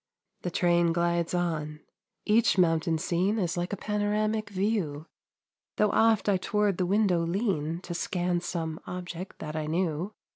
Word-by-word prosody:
The 180 - -2
train 175 -1 +2
glides 170 0 0
on. 155 -3 -2 0.4
Each 220 0 +3
mountain 165 -2 +3
scene 180 +6 0
Is 180 -4 0
like 175 +1 -2
a 205 - -2
panoramic 210 +1 -1
view, 190 -7 -1 0.7
Though 210 -1 +2
oft 225 -2 +3
I 200 -2 +4
toward 205 0 0
the 180 - +1
window 200 -2 +3
lean, 170 -3 -1
To 175 - -6
scan 175 0 -1
some 165 -2 -3
object 180 0 -6
that 155 0 -6
I 155 -1 -2
knew. 175 +3 -1
175 Hz, 150 wpm, -28 LUFS, 165-205 Hz, 0.7 s, I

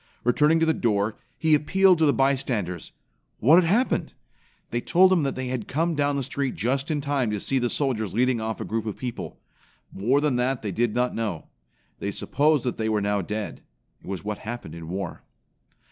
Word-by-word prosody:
Returning 150 +7 +3
to 165 - +3
the 160 - +3
door, 105 -4 0 0.2
he 160 -1 +2
appealed 185 +4 +4
to 160 - +4
the - - +5
bystanders. 125 - -1 0.5
What 155 +10 +6
had - - -1
happened? 240 +7 +1 0.6
They 120 - -1
told 185 +6 +5
him 175 - +3
that 135 -2 -1
they 130 -1 -4
had 125 -4 -3
come 165 +4 0
down 145 -1 +1
the 140 - -1
street 135 0 -2
just 135 - -1
in 150 -2 0
time 140 -4 0
to 105 -1 -2
see 135 +6 0
the 120 -1 0
soldiers 115 -9 -1
leading 125 +1 +1
off 110 0 -3
a - - -4
group 110 0 -3
of 105 - -4
people. 125 -2 -6 0.5
More 120 +9 +1
than 145 -4 +1
that 125 0 0
they 105 - -2
did 115 +3 0
not 125 0 +1
know. 105 -8 -4 0.5
They 100 - -2
supposed 145 +7 +1
that 125 - -2
they 110 0 0
were 110 -1 +1
now 100 0 0
dead. 105 +3 -5 0.4
It - - -16
was 95 0 -4
what 105 0 -3
happened 115 -8 -7
in 85 -1 -8
war. 95 -1 -4
125 Hz, 205 wpm, -25 LUFS, 105-145 Hz, 0.6 s, What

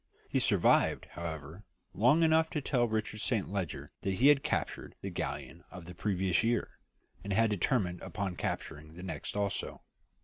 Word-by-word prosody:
He - - +1
survived, - - +3
however, 80 +2 -6 0.3
long 130 - +4
enough 160 0 +4
to 160 - -1
tell 125 -4 +1
Richard 110 -1 -2
Saint 110 -5 0
Leger 80 -8 -3
that 95 -1 -1
he 135 +8 +6
had 145 -2 +6
captured - - -2
the - - -4
galleon 75 +4 -4
of 90 -2 -10
the 90 - -8
previous 95 -2 +1
year, 115 +1 0 0.4
and 100 - -4
had 115 +2 +3
determined 95 -3 0
upon 95 -3 -3
capturing 75 -1 -4
the 90 - -9
next 95 +2 -5
also. 100 -2 -2
100 Hz, 165 wpm, -32 LUFS, 85-120 Hz, 0.4 s, he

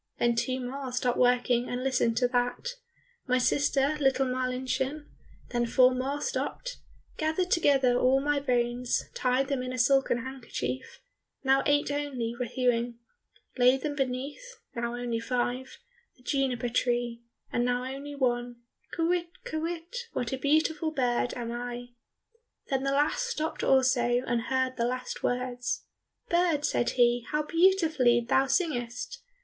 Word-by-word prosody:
Then 240 0 +2
two 255 +2 -1
more 260 +1 -5
stopped 250 0 0
working 245 -1 +3
and 245 +1 -3
listened 250 -3 +1
to 250 - +3
that, 245 - 0 0.6
"My 255 0 +3
sister, 280 +3 +2
little 270 -1 +3
Marlinchen," 255 +3 -2 0.5
Then 240 -1 0
four 255 +2 +5
more 270 +3 -2
stopped, - - -3 0.4
"Gathered 320 +4 0
together 270 -6 +4
all 260 +1 +4
my 290 +1 +1
bones, 245 -2 0
Tied 255 +1 +1
them 275 -2 -1
in 255 0 -4
a 255 - -4
silken 250 -1 +3
handkerchief," 245 - -5 0.4
Now 270 0 +4
eight 290 0 +2
only 265 -5 -2
were 245 0 -3
hewing, 240 -1 0 0.6
"Laid 255 +2 +5
them 295 +1 -2
beneath" 280 - -3 0.2
Now 235 0 -2
only 240 -1 -2
five, 250 +2 -2 0.4
"The 250 - -23
juniper 255 -3 0
tree," 240 -1 0 0.3
And 240 - +2
now 245 0 0
only 275 +3 -6
one, 245 -2 0 0.4
"Kywitt, 345 +1 +1 0.2
kywitt, 340 +6 -4
what 245 0 -2
a - - -1
beautiful 315 +2 +2
bird 245 -4 0
am 235 -1 -4
I!" 245 0 -5 0.8
Then 265 -1 +1
the 275 0 0
last 295 - +1
stopped 320 -9 -3
also, 250 -2 +3
and 240 -1 0
heard 260 0 0
the 235 - +1
last 255 +1 -3
words. 250 0 -2 0.4
"Bird," 340 -4 +2
said 240 - +1
he, 240 -1 +3
"how 300 0 0
beautifully 325 -8 +3
thou 270 +2 +3
singest! 250 -6 -1
255 Hz, 145 wpm, -28 LUFS, 245-285 Hz, 0.8 s, four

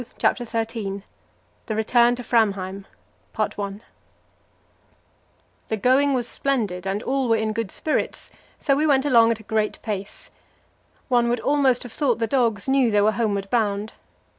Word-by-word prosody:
CHAPTER 245 - +1
XIII 225 -4 -3 0.6
The 220 - -2
Return 235 +2 +3
to 245 - -7
Framheim 195 -4 0 0.5
The 200 -1 -2 2.0
going 265 +5 +3
was 240 -2 -1
splendid 215 -11 -1
and 200 +3 -2
all 265 -2 0
were 225 - +4
in 220 -1 -1
good 230 -2 -3
spirits, 305 +9 -3 0.3
so 275 - +1
we 305 +3 +1
went 275 -1 +3
along 230 -5 +5
at 230 -1 0
a - - -13
great 215 0 -1
pace. 200 -3 -6 0.8
One 240 -2 +2
would 240 0 0
almost 275 -4 +2
have 245 -2 -10
thought 270 -6 +1
the 230 - 0
dogs 230 -3 0
knew 265 -2 +3
they 210 -1 +3
were 210 +1 +4
homeward 205 -3 -1
bound. 210 -2 0
230 Hz, 150 wpm, -23 LUFS, 210-255 Hz, 2.0 s, along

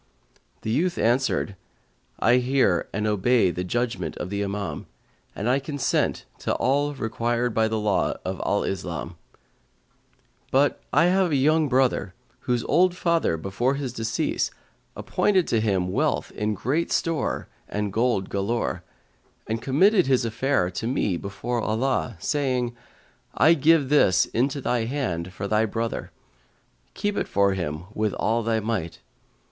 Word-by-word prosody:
"[FN#148] - - -38
the 110 - -2
youth 170 +8 +1
answered, 120 -4 +1 0.6
"I 120 +5 +4
hear 125 -8 +2
and 105 +1 -2
obey 105 -1 +3
the 90 - -3
judgement 120 +6 -2
of 90 - -5
the 100 0 -1
Imam, 100 0 -4 0.5
and 105 - -3
I 130 +3 +3
consent 140 -1 -1
to - - -1
all 145 +2 +1
required 120 0 -1
by 110 0 +2
the 110 0 -1
law 105 -2 +1
of 95 0 -3
Al 100 - +1
Islam; 85 -2 -4 1.3
but 140 +2 +2
I - - +4
have 185 0 +3
a - - +2
young 150 +2 +3
brother, 130 -7 +1 0.2
whose 125 -2 -1
old 180 +3 +3
father, 170 - +1
before 100 - -1
his 135 -4 -4
decease, 115 -1 -1 0.5
appointed 190 -4 +1
to 115 - +2
him 95 -4 0
wealth - - 0
in 105 0 -2
great 145 - -1
store 165 -2 -1 0.2
and 105 -1 -2
gold 115 -4 +1
galore, 100 +4 -2 0.6
and 110 +1 -3
committed 185 - +4
his 130 -2 +2
affair 115 -5 0
to 110 +5 -4
me 110 -7 0
before 115 +6 -3
Allah, 115 +2 0
saying: 125 - -1 0.6
I 155 +9 +6
give 155 -2 +3
this 120 - +4
into 135 +4 -1
thy 120 -3 0
hand 95 - -3
for 100 - -5
thy 110 +2 +2
brother; 115 +2 -3 0.9
keep 205 0 -1
it - - -1
for 100 -1 +2
him 80 -4 -3
with 105 -2 0
all 115 +2 +1
thy 115 0 0
might.' 105 -7 -3
115 Hz, 150 wpm, -25 LUFS, 100-135 Hz, 1.3 s, I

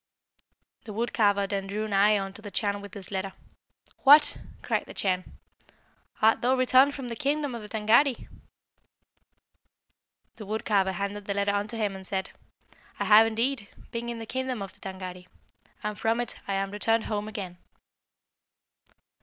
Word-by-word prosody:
"The 215 - -7
wood 235 +3 -2
carver 205 -3 +3
then 195 -1 -3
drew 210 +2 -3
nigh 205 +1 +4
unto 195 +2 -6
the 210 - -7
Chan 200 0 -1
with 205 -2 -10
this 195 -1 -7
letter. 190 0 -3 0.6
'What!' 290 +2 +7 0.2
cried - - 0
the - - -10
Chan, 185 -2 -2 0.9
'art 220 +1 +5
thou 255 +2 +3
returned 260 +2 +4
from 270 -3 -6
the 230 - -4
kingdom 285 +2 -1
of 235 - -5
the 210 - -10
Tângâri?' 230 +5 +3 2.1
The 215 - -8
wood 220 +2 -3
carver 195 -3 +2
handed 200 +2 -4
the 200 - -2
letter 200 0 +1
unto 205 +3 -2
him, 205 -3 -1
and 190 -1 -9
said, 190 -1 -2 0.7
'I - - 0
have, 220 +1 +7
indeed, 230 0 -1 0.2
been 235 0 -4
in 235 - -4
the 225 - -6
kingdom 255 -2 -3
of 195 - -9
the - - -21
Tângâri, 185 -1 -7 0.6
and 210 0 -3
from 225 +1 +1
it 240 -2 -3
I 200 - -1
am 195 0 -1
returned 225 +2 +1
home 210 -1 -3
again.' 190 -5 -6
210 Hz, 165 wpm, -27 LUFS, 195-230 Hz, 2.1 s, What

